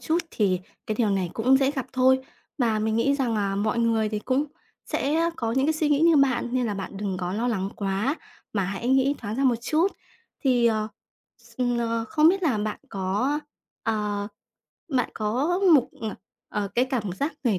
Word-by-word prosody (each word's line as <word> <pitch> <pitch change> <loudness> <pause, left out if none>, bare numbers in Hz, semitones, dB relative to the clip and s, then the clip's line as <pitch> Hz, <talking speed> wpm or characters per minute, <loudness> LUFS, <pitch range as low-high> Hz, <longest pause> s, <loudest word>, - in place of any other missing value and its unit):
chút 325 +2 +1
thì 190 -4 +1 0.3
cái 215 - -1
điều 215 -1 +1
này 190 -3 0
cũng 255 +4 +4
dễ 270 0 +2
gặp 265 -4 -4
thôi. 260 0 +4 0.4
Mà 225 -4 +2
mình 220 +1 0
nghĩ 275 +5 +3
rằng 250 -5 0
là 200 -2 0
mọi 215 +3 0
người 225 -2 +2
thì 210 0 -2
cũng 260 +6 0 0.4
sẽ 320 +5 +1
có 225 -1 -1
những 265 +3 +2
cái 315 - +3
suy 310 -1 0
nghĩ 290 -1 +3
như 330 -1 +6
bạn, 265 -3 +3
nên 250 -1 +1
là 210 - -2
bạn 195 0 -6
đừng 195 -2 -2
có 180 -1 -3
lo 230 +5 0
lắng 195 -4 -1
quá, 200 +8 -1 0.4
mà 200 -3 0
hãy 195 +5 -3
nghĩ 265 +2 +3
thoáng 215 -1 -5
ra 275 - +1
một 245 -3 +4
chút. 315 +9 +2 0.6
Thì, 245 -3 +4
ờ, 215 -2 +1 0.5
s - - -20 0.2
ờ, 230 -1 -1
không 310 0 +5
biết 380 +2 +2
là 265 -10 +2
bạn 210 0 -2
có, 200 +10 0 0.4
ờ, 210 -2 -1 0.6
bạn 260 -6 0
có 255 +12 0 0.2
một, 265 -5 +4
ờ, 220 -2 -3 0.3
ờ, 205 -1 -2
cái 245 +2 +4
cảm 235 -8 -2
giác 285 - -2
về 215 -6 +2
235 Hz, 205 wpm, -25 LUFS, 210-270 Hz, 0.6 s, như